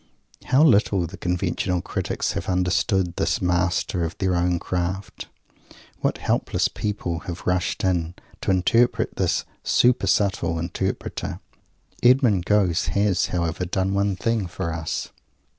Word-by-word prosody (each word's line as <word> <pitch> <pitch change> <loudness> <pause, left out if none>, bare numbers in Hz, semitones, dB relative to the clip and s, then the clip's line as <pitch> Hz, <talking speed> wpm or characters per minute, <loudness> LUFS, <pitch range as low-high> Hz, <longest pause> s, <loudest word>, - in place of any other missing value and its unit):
How 135 +4 +4
little 100 - +4
the 85 +4 -8
conventional 90 0 -1
critics - - -2
have - - -4
understood 90 0 +1
this - - +1
master 90 0 0
of 85 +1 -4
their 95 -2 0
own 90 0 +1
craft! 90 +2 -4 0.7
What - - 0
hopeless - - +1
people 90 -5 -3
have 85 -1 -6
"rushed 90 -1 0
in" 90 -2 0 0.3
to - - -3
interpret 95 +6 +2
this - - 0 0.2
super 120 -5 +3
subtle 95 -4 +1
Interpreter! 85 +1 -3 0.6
Mr. 120 -7 +4
Gosse 90 -5 +2
has, 100 -3 +2
however, 85 0 -2
done 95 +2 -1
one 100 0 +1
thing 115 -1 -1
for 85 -1 -4
us. 80 -1 -3
90 Hz, 130 wpm, -23 LUFS, 85-100 Hz, 0.7 s, How